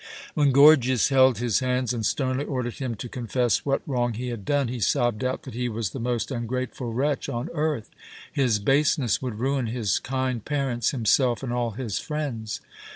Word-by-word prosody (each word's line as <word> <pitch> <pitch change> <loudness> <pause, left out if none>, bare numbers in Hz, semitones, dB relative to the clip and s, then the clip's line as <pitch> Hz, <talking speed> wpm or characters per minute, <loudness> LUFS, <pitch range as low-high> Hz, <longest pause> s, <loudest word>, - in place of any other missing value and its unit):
When 145 -2 +3
Gorgias 135 -4 +6
held 130 -3 +5
his 120 -1 +1
hands 125 -1 0
and 115 -2 -3
sternly 130 +3 0
ordered 125 -5 -3
him 130 -4 -3
to 115 - -6
confess 120 0 0
what 135 - +1
wrong 120 -4 0
he 125 +2 -4
had 115 -5 -6
done, 145 -3 +1
he 120 +1 -4
sobbed 120 0 +1
out 130 0 -2
that 130 - -9
he 125 +1 -2
was 110 -3 -3
the 135 - -6
most 120 +2 -2
ungrateful 125 0 -3
wretch 140 +4 -1
on 120 +7 -3
earth. 150 -8 -1 0.4
His 125 -6 +2
baseness 135 - +2
would 125 -5 -4
ruin 130 +1 0
his 110 -4 0
kind 130 -3 -2
parents, 135 -5 0
himself, 125 -1 +2
and 120 -2 -3
all 120 -2 -1
his 115 -7 -2
friends. 140 -9 -4
125 Hz, 185 wpm, -25 LUFS, 120-135 Hz, 0.4 s, Gorgias